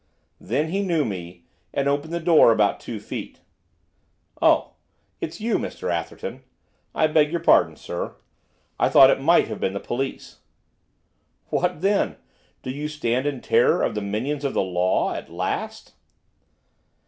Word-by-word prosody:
Then 145 Hz, +7 st, -1 dB
he 195 Hz, +4 st, -1 dB
knew 170 Hz, -6 st, +1 dB
me, 90 Hz, -4 st, -7 dB, 0.3 s
and 140 Hz, -, -1 dB
opened 145 Hz, +3 st, -1 dB
the 170 Hz, -, -2 dB
door 160 Hz, -7 st, +6 dB
about 105 Hz, -2 st, +2 dB
two 115 Hz, -3 st, -6 dB
feet. 105 Hz, -, -8 dB, 1.0 s
'Oh, -, -, +3 dB, 0.5 s
it's 160 Hz, -, -5 dB
you, 225 Hz, 0 st, 0 dB
Mr 90 Hz, -, -4 dB
Atherton. 85 Hz, -1 st, -5 dB, 0.5 s
I -, -, +3 dB
beg 155 Hz, -1 st, +3 dB
your 170 Hz, +2 st, -2 dB
pardon, -, -, +4 dB
sir, -, -, -6 dB, 0.6 s
I -, -, +3 dB
thought 135 Hz, 0 st, +8 dB
it -, -, 0 dB
might 170 Hz, +5 st, +4 dB
have 110 Hz, -, -6 dB
been 95 Hz, -, -1 dB
the 100 Hz, -, -3 dB
police.' 135 Hz, +5 st, -5 dB, 1.1 s
'What 180 Hz, -2 st, 0 dB
then? 195 Hz, -, +1 dB, 0.5 s
Do 130 Hz, -, -4 dB
you 145 Hz, +3 st, -4 dB
stand 130 Hz, -3 st, -1 dB
in 140 Hz, -4 st, -3 dB
terror -, -, +3 dB
of -, -, 0 dB
the 105 Hz, -, -3 dB
minions 120 Hz, +9 st, -3 dB
of 140 Hz, -, -2 dB
the -, -, +2 dB
law, 90 Hz, 0 st, 0 dB
at -, -, -7 dB
last? -, -, -4 dB
135 Hz, 155 wpm, -23 LUFS, 105-155 Hz, 1.1 s, thought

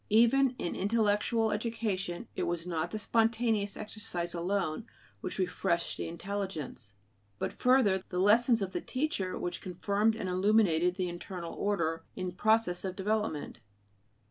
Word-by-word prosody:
Even 240 Hz, +4 st, +5 dB
in 175 Hz, -, -2 dB
intellectual 220 Hz, +2 st, +2 dB
education 210 Hz, -5 st, -2 dB
it -, -, -1 dB
was 170 Hz, -1 st, -2 dB
not 165 Hz, -1 st, -2 dB
the 215 Hz, -, -4 dB
spontaneous 225 Hz, -2 st, +1 dB
exercise 210 Hz, -5 st, -4 dB
alone 175 Hz, -2 st, -1 dB, 0.3 s
which -, -, -4 dB
refreshed 180 Hz, -2 st, 0 dB
the -, -, -4 dB
intelligence; 170 Hz, -, -5 dB, 0.4 s
but -, -, -3 dB
further, 250 Hz, -7 st, +3 dB
the 180 Hz, -, -4 dB
lessons 225 Hz, +4 st, +5 dB
of 190 Hz, -, -4 dB
the -, -, -2 dB
teacher 255 Hz, -9 st, -2 dB
which 175 Hz, -, -4 dB
confirmed 200 Hz, +4 st, +1 dB
and 210 Hz, -4 st, -4 dB
illuminated 180 Hz, -2 st, +3 dB
the 185 Hz, -2 st, -1 dB
internal 175 Hz, 0 st, -6 dB
order 165 Hz, -5 st, -1 dB
in 185 Hz, -1 st, -3 dB
process 215 Hz, -1 st, +2 dB
of 190 Hz, -1 st, -3 dB
development. 205 Hz, -, -2 dB
200 Hz, 140 wpm, -31 LUFS, 175-220 Hz, 0.4 s, Even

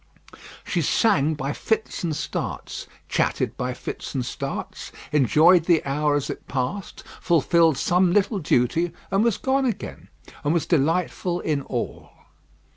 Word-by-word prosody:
She -, -, -1 dB
sang 160 Hz, -, +2 dB
by 140 Hz, 0 st, -3 dB
fits 220 Hz, -3 st, -2 dB
and 165 Hz, -3 st, -1 dB
starts, -, -, -4 dB, 0.2 s
chatted -, -, 0 dB
by 125 Hz, 0 st, -3 dB
fits -, -, -6 dB
and 130 Hz, -2 st, -1 dB
starts, 135 Hz, +2 st, -5 dB, 0.2 s
enjoyed 155 Hz, +5 st, +5 dB
the 170 Hz, -2 st, +3 dB
hour 145 Hz, +1 st, +1 dB
as 145 Hz, -, -1 dB
it -, -, -9 dB
passed, 140 Hz, +8 st, -4 dB, 0.2 s
fulfilled 165 Hz, -2 st, +3 dB
some 180 Hz, +3 st, +3 dB
little 200 Hz, +2 st, +2 dB
duty, 160 Hz, +3 st, +1 dB, 0.2 s
and 195 Hz, +2 st, +3 dB
was 230 Hz, -4 st, +2 dB
gone 270 Hz, 0 st, +1 dB
again, 235 Hz, -, -5 dB, 0.4 s
and 150 Hz, +3 st, +1 dB
was 170 Hz, -, +1 dB
delightful 175 Hz, +3 st, 0 dB
in 150 Hz, -3 st, 0 dB
all. -, -, -5 dB
165 Hz, 140 wpm, -24 LUFS, 140-180 Hz, 0.4 s, enjoyed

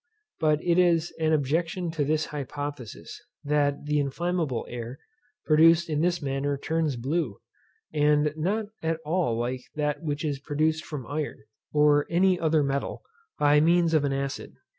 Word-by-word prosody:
But 155 Hz, -1 st, +2 dB
it 175 Hz, 0 st, +3 dB
is 170 Hz, -2 st, +3 dB
an 160 Hz, -1 st, +2 dB
objection 165 Hz, +4 st, 0 dB
to 160 Hz, -3 st, -1 dB
this 155 Hz, +2 st, 0 dB
hypothesis, 145 Hz, -3 st, -6 dB, 0.2 s
that 145 Hz, 0 st, 0 dB
the 150 Hz, 0 st, +1 dB
inflammable 150 Hz, -1 st, -1 dB
air 120 Hz, +1 st, -6 dB, 0.5 s
produced 165 Hz, +2 st, +5 dB
in 150 Hz, 0 st, 0 dB
this 175 Hz, -1 st, 0 dB
manner 140 Hz, +1 st, -1 dB
burns 160 Hz, -1 st, -1 dB
blue, 135 Hz, -, -2 dB, 0.6 s
and 150 Hz, 0 st, +3 dB
not 200 Hz, +8 st, -1 dB, 0.2 s
at 160 Hz, 0 st, -1 dB
all 160 Hz, -8 st, 0 dB
like 125 Hz, +2 st, -2 dB
that 150 Hz, -1 st, -1 dB
which 150 Hz, -1 st, -3 dB
is 145 Hz, -3 st, -2 dB
produced 155 Hz, +2 st, 0 dB
from 145 Hz, -6 st, -6 dB
iron, 145 Hz, -4 st, -4 dB, 0.3 s
or 150 Hz, -1 st, +4 dB
any 180 Hz, +1 st, +3 dB
other 160 Hz, -2 st, +2 dB
metal, 140 Hz, 0 st, -2 dB, 0.3 s
by 145 Hz, 0 st, +4 dB
means 170 Hz, +1 st, +3 dB
of 155 Hz, -2 st, +3 dB
an 140 Hz, -, 0 dB
acid. 135 Hz, 0 st, -4 dB
150 Hz, 155 wpm, -26 LUFS, 140-165 Hz, 0.6 s, produced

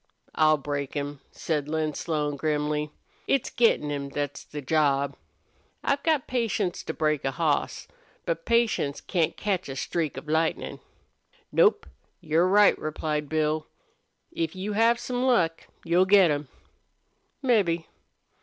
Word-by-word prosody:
"I'll 155 Hz, 0 st, +4 dB
break 145 Hz, 0 st, -4 dB
him," 145 Hz, -1 st, -3 dB
said 150 Hz, -3 st, -2 dB
Lin 155 Hz, -1 st, -1 dB
Slone, 150 Hz, -2 st, -2 dB
grimly. 150 Hz, 0 st, -1 dB, 0.4 s
"It's 275 Hz, -, +1 dB
gettin' 220 Hz, -11 st, +2 dB
him 140 Hz, -1 st, -3 dB
thet's 145 Hz, 0 st, -4 dB
the 150 Hz, -, -8 dB
job. 140 Hz, -1 st, +1 dB, 0.7 s
I've 280 Hz, -, +1 dB
got 310 Hz, -5 st, +1 dB
patience 225 Hz, -7 st, -1 dB
to -, -, -2 dB
break 155 Hz, -2 st, 0 dB
a 135 Hz, -, +1 dB
hoss. 155 Hz, 0 st, -1 dB, 0.4 s
But 165 Hz, 0 st, -2 dB
patience 230 Hz, -12 st, +1 dB
can't 170 Hz, -4 st, -1 dB
catch 190 Hz, -6 st, -1 dB
a 135 Hz, -, -5 dB
streak 160 Hz, +2 st, -2 dB
of -, -, -8 dB
lightnin'." 160 Hz, +1 st, -1 dB, 0.7 s
"Nope; -, -, +4 dB, 0.3 s
you're 165 Hz, +4 st, +2 dB
right," 205 Hz, +2 st, +6 dB
replied 150 Hz, -1 st, -3 dB
Bill. 155 Hz, 0 st, 0 dB, 0.6 s
"If 165 Hz, 0 st, -3 dB
you 195 Hz, +3 st, -3 dB
have 230 Hz, +2 st, +3 dB
some 245 Hz, -1 st, -3 dB
luck 235 Hz, -11 st, +1 dB, 0.2 s
you'll 175 Hz, +2 st, +3 dB
get 190 Hz, -4 st, +6 dB
him 145 Hz, -1 st, -2 dB, 1.0 s
mebbe. 195 Hz, -10 st, +2 dB
155 Hz, 135 wpm, -26 LUFS, 150-190 Hz, 1.0 s, right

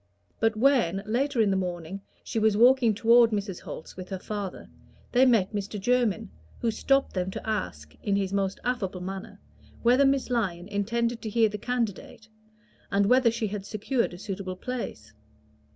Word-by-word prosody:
But 225 Hz, 0 st, +2 dB
when, 215 Hz, -7 st, +2 dB
later 250 Hz, +3 st, +1 dB
in 205 Hz, -2 st, +3 dB
the -, -, +2 dB
morning, 180 Hz, 0 st, -4 dB, 0.2 s
she 225 Hz, -, -2 dB
was 215 Hz, -1 st, +3 dB
walking 240 Hz, -1 st, +5 dB
toward 235 Hz, +2 st, +6 dB
Mrs. 200 Hz, -4 st, -3 dB
Holt's -, -, -9 dB
with 185 Hz, 0 st, -8 dB
her 190 Hz, -, -3 dB
father, 200 Hz, 0 st, -6 dB, 0.4 s
they 260 Hz, +1 st, +5 dB
met 220 Hz, -5 st, +3 dB
Mr. 205 Hz, 0 st, -3 dB
Jermyn, 225 Hz, -1 st, +1 dB, 0.3 s
who 230 Hz, -, 0 dB
stopped 275 Hz, +5 st, +1 dB
them 185 Hz, -1 st, -1 dB
to 190 Hz, -, -7 dB
ask, 85 Hz, -, -3 dB
in 200 Hz, -, 0 dB
his 195 Hz, -1 st, -1 dB
most 195 Hz, -1 st, -1 dB
affable 205 Hz, -7 st, -2 dB
manner, 195 Hz, +2 st, -7 dB, 0.4 s
whether 250 Hz, +4 st, +5 dB
Miss 270 Hz, -2 st, +1 dB
Lyon 185 Hz, -7 st, -1 dB
intended 230 Hz, +3 st, -1 dB
to 220 Hz, -, -4 dB
hear 225 Hz, 0 st, +3 dB
the 210 Hz, 0 st, -6 dB
candidate, 225 Hz, -2 st, -3 dB, 0.6 s
and 200 Hz, 0 st, +2 dB
whether 250 Hz, +2 st, +5 dB
she 230 Hz, 0 st, -2 dB
had 205 Hz, -1 st, -5 dB
secured 215 Hz, 0 st, -1 dB
a -, -, -10 dB
suitable 190 Hz, -1 st, -5 dB
place. 205 Hz, -, -6 dB
215 Hz, 170 wpm, -27 LUFS, 195-235 Hz, 0.6 s, toward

